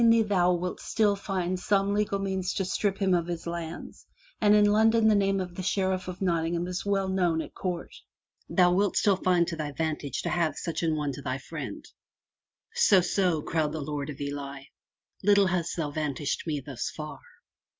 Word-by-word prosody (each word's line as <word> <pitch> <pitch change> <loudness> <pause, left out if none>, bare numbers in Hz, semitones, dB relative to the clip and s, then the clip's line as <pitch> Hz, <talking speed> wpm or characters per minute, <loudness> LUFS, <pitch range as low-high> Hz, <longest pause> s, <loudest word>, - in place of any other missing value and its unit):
I - - +4
ween 230 -1 +5
thou 180 -3 +3
wilt 180 +1 -3
still 210 -3 +1
find 185 -2 -2
some 200 +1 +1
legal 210 -1 0
means 190 -2 -2
to 190 - 0
strip 195 +1 0
him 190 -2 +2
of 170 -1 +1
his 170 -1 -4
lands, 170 -1 -6 0.3
and 210 -1 +6
in 210 0 +6
London 220 +2 +4
the 215 - +6
name 195 -1 +2
of 180 -2 -4
the 185 - -5
Sheriff 185 0 0
of 185 +1 -5
Notting 170 -2 +1
ham 170 +1 -1
is 180 +1 -4
well 195 -1 0
known 180 -4 +1
at - - -6
court. 180 -2 -4 0.6
Thou 180 -2 +4
wilt 200 +2 +1
still 200 -3 +3
find 180 -2 +3
it - - -4
to 165 - -5
thy 150 -2 -3
vantage 155 -3 -2
to - - -1
have 165 -4 0
such 165 - -3
an 160 -2 +1
one 150 -2 -1
to 140 - -8
thy 130 -1 -2
friend/* 135 -5 -7 0.9
'*So, 190 -2 +5
so,'' 175 -3 +1
growled 155 -1 -1
the 160 - -3
Lord 145 0 -4
of 145 - -7
Ely, 140 -1 -5 0.3
* - - -35
little 200 0 +5
hast 175 -2 -1
thou 150 -3 -2
vantaged 145 0 -2
me 150 -3 -1
thus 130 -4 -4
far!'' 155 -1 -7
180 Hz, 210 wpm, -28 LUFS, 160-195 Hz, 0.9 s, and